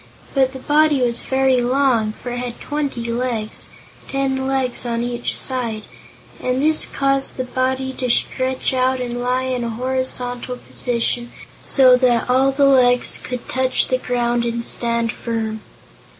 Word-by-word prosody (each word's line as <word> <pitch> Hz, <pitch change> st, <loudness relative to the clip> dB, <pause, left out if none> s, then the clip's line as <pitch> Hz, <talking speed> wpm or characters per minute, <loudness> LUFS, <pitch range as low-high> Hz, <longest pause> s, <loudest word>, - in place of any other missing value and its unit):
But 265 Hz, -2 st, +3 dB
the -, -, -6 dB
body 295 Hz, +1 st, +3 dB
was 240 Hz, -1 st, 0 dB
very 265 Hz, -1 st, +2 dB
long, 245 Hz, -4 st, +2 dB
for 245 Hz, -, -7 dB
it 245 Hz, -, -3 dB
had 245 Hz, -1 st, -5 dB
twenty 275 Hz, -6 st, -3 dB
legs 235 Hz, -3 st, -2 dB, 0.4 s
ten 265 Hz, -1 st, -1 dB
legs 265 Hz, -2 st, +1 dB
on 235 Hz, -1 st, -2 dB
each 240 Hz, 0 st, -2 dB
side 235 Hz, -5 st, -2 dB, 0.6 s
and 255 Hz, +1 st, -1 dB
this 310 Hz, +2 st, +2 dB
caused 275 Hz, 0 st, 0 dB
the 255 Hz, -, -1 dB
body 260 Hz, +1 st, -1 dB
to 250 Hz, -1 st, -1 dB
stretch 260 Hz, +2 st, 0 dB
out 255 Hz, 0 st, +1 dB
and 245 Hz, -1 st, -3 dB
lie 250 Hz, +1 st, 0 dB
in 255 Hz, -2 st, -2 dB
a 235 Hz, -, -2 dB
horizontal 250 Hz, 0 st, -2 dB
position, 240 Hz, -1 st, -2 dB, 0.3 s
so 255 Hz, -2 st, +6 dB
that 245 Hz, -2 st, +2 dB
all 265 Hz, +2 st, +4 dB
the 280 Hz, +1 st, +3 dB
legs 250 Hz, -2 st, +4 dB
could 250 Hz, -1 st, -6 dB
touch 260 Hz, 0 st, +1 dB
the 255 Hz, -, +1 dB
ground 240 Hz, -1 st, 0 dB
and 235 Hz, 0 st, -2 dB
stand 235 Hz, -1 st, +1 dB
firm. 220 Hz, -2 st, -4 dB
250 Hz, 155 wpm, -20 LUFS, 240-265 Hz, 0.6 s, so